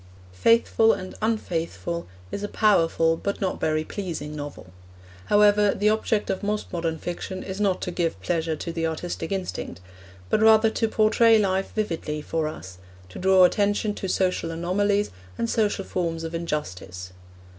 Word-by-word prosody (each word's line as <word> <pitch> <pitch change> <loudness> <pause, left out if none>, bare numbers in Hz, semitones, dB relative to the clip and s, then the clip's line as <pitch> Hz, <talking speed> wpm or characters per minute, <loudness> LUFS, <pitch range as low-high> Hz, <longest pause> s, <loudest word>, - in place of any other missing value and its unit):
Faithful 225 - +4
and 185 -2 -6
Unfaithful 170 -5 -2 0.2
is - - -4
a 205 - -2
powerful 165 -7 +3
but 200 +4 -3
not 190 -2 -2
very 155 0 +1
pleasing 160 -5 -5
novel. 145 - -8 0.5
However, 205 0 +4
the 210 +1 +2
object 215 -1 0
of 190 - -3
most 210 0 -3
modern 165 -2 -1
fiction 180 +3 -5
is 190 +1 -5
not 195 -3 +1
to 180 - -3
give 170 - -1
pleasure 160 - -1
to 170 - -5
the 165 -1 -1
artistic 165 +1 -4
instinct, 190 - -4 0.5
but 210 - +1
rather 220 0 +6
to 225 - 0
portray 220 +1 +4
life 195 -2 0
vividly 165 -8 -2
for 155 +1 -2
us, 90 - -8 0.3
to - - -9
draw 190 0 +5
attention 205 +3 +2
to 195 - -5
social 185 -3 0
anomalies, 200 +5 0 0.3
and 230 - -1
social 210 -4 0
forms 165 -3 -2
of 165 0 -5
injustice. 95 - -5
185 Hz, 155 wpm, -25 LUFS, 165-205 Hz, 0.5 s, rather